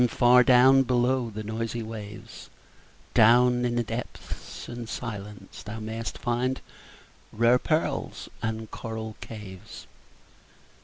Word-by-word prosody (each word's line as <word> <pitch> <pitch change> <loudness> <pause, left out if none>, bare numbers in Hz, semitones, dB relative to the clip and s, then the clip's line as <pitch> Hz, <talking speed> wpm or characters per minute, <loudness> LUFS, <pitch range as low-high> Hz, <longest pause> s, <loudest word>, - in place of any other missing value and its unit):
far 125 +1 +5
down 130 +2 +6
below 125 -1 +1
the 110 0 -6
noisy 115 +2 -3
waves, 110 -2 -9 0.6
Down 125 +2 +5
in 120 -1 0
the 120 - +1
depths 115 +2 -7
and 120 -1 -7
silence 105 -4 -7
thou 110 +1 -7
mayst 110 +1 -5
find 125 +2 -1 0.7
Rare 115 +3 +4
pearls 155 +3 -1
and 110 -1 -3
coral 110 -1 -6
caves. 100 -5 -9
115 Hz, 110 wpm, -27 LUFS, 110-125 Hz, 0.7 s, down